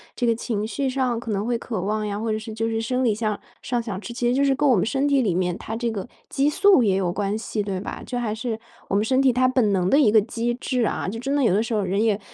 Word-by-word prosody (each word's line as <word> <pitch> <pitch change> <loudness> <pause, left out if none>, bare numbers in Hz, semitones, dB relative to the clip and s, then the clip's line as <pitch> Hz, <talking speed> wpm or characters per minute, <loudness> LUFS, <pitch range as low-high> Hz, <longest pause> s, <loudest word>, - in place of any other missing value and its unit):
这 245 - -1
个 230 - +4
情 220 -2 -2
绪 270 +4 -1
上 255 -3 0
可 230 - -8
能 205 0 -1
会 240 - 0
渴 225 -4 -4
望 210 +3 -1
呀， 205 0 -3
或 225 0 -2
者 215 - -1
是 220 +1 -8
就 225 +1 -2
是 225 0 -1
生 250 +3 -1
理 225 - +3
向 215 -1 -2 0.2
上 245 -2 -1
想 205 -4 -5
吃， 235 - -7
其 240 0 -1
实 245 - +2
就 275 +2 +2
是 275 -1 +3
跟 290 +2 +2
我 255 - +5
们 180 - +2
身 270 +5 0
体 280 -2 +3
里 200 -8 +1
面 180 -1 0
它 225 - -5
这 235 0 -1
个 205 0 -5 0.2
激 280 +1 +1
素 390 0 +5
也 200 -5 +3
有 180 -2 0
关 205 +1 -1
系， 220 -1 -3
对 195 -2 -3
吧？ - - -6
这 245 - -4
还 230 -3 -1
是 225 0 -3 0.3
我 - - -1
们 205 +2 +2
身 260 +3 +2
体 270 -1 +5
它 255 +1 +3
本 255 -5 +2
能 185 -2 +1
的 280 - +5
一 230 -8 +5
个 220 - +6
机 235 +3 -2
制 250 0 -1
啊。 - - -2
就 220 +4 -4
真 275 +4 -1
的 285 - +2
有 225 - +3
的 205 - +3
时 230 - -4
候， 210 - +1
人 195 +3 0
也 215 -3 +2
225 Hz, 335 characters per minute, -23 LUFS, 210-250 Hz, 0.3 s, 个